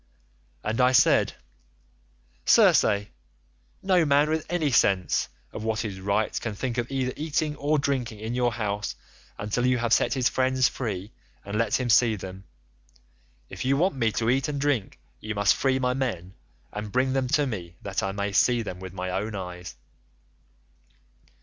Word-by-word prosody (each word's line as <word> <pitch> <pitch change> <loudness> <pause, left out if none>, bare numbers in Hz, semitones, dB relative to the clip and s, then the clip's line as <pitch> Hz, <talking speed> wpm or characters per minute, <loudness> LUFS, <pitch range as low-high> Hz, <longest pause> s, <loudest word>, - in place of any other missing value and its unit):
"And 110 +4 0
I 125 +1 +4
said, - - +4 1.1
'Circe, 100 -1 +5 0.8
no 185 -3 +3
man 145 +1 +3
with 160 0 -1
any 160 -5 0
sense 90 - +2 0.2
of - - -6
what 110 0 -1
is 95 -3 -5
right 100 +3 -1
can 110 -3 -4
think 125 +3 -2
of 120 - -3
either 130 -2 -1
eating 150 0 -1
or 150 +2 +1
drinking 130 -6 -2
in 110 +2 -4
your 120 -1 +1
house 105 -2 -3 0.4
until 105 +4 -2
you 125 0 +3
have 120 -1 +1
set - - +2
his 130 -2 +2
friends 130 0 +2
free 105 -4 -4 0.3
and 100 +1 -5
let 115 +2 +1
him 125 - -1
see 115 0 +5
them. 95 0 -9 1.0
If - - -7
you 135 +2 +2
want 180 +6 +2
me 115 -4 +1
to 115 +1 +1
eat 135 +1 +1
and 145 -1 -3
drink, 135 -8 -1 0.2
you 110 0 -5
must 100 0 +3
free 135 -1 +1
my 125 -1 0
men 95 -9 -3 0.4
and 105 0 -5
bring 130 +2 +1
them 135 -1 0
to 145 - +1
me 90 -9 -5
that 100 0 -2
I 95 -2 -1
may 100 +1 -2
see 120 +4 +3
them 90 -4 -6
with 95 -1 -8
my 90 -1 -4
own 105 +3 -3
eyes. 90 -4 -7
115 Hz, 175 wpm, -26 LUFS, 100-130 Hz, 1.1 s, Circe